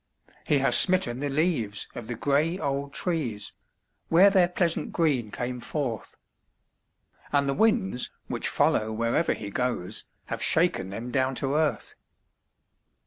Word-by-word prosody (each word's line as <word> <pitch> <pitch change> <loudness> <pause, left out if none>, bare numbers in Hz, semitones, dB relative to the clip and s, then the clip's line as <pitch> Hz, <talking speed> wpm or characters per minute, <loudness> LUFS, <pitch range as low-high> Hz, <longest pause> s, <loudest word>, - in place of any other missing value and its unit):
He 145 - +4
has 135 0 +4
smitten 180 -10 +4
the 145 +1 -2
leaves 135 - 0
of 120 -2 -8
the 120 - -4
gray 145 +8 +1
old 140 -3 -3
trees 135 - -3 0.5
where 190 +5 +6
their 185 -3 +4
pleasant 175 -1 -1
green 140 -10 +1
came 125 +3 -4
forth, 120 -4 -4 1.2
And 140 -1 +2
the 140 - +1
winds, 210 - +1 0.2
which - - -2
follow 110 0 +1
wherever 115 +8 0
he 100 -1 -7
goes, 115 -5 -2 0.2
have - - -4
shaken 95 - +2
them 115 +5 -6
down 130 0 0
to 135 +2 -1
earth. 155 0 0
140 Hz, 140 wpm, -26 LUFS, 120-165 Hz, 1.2 s, where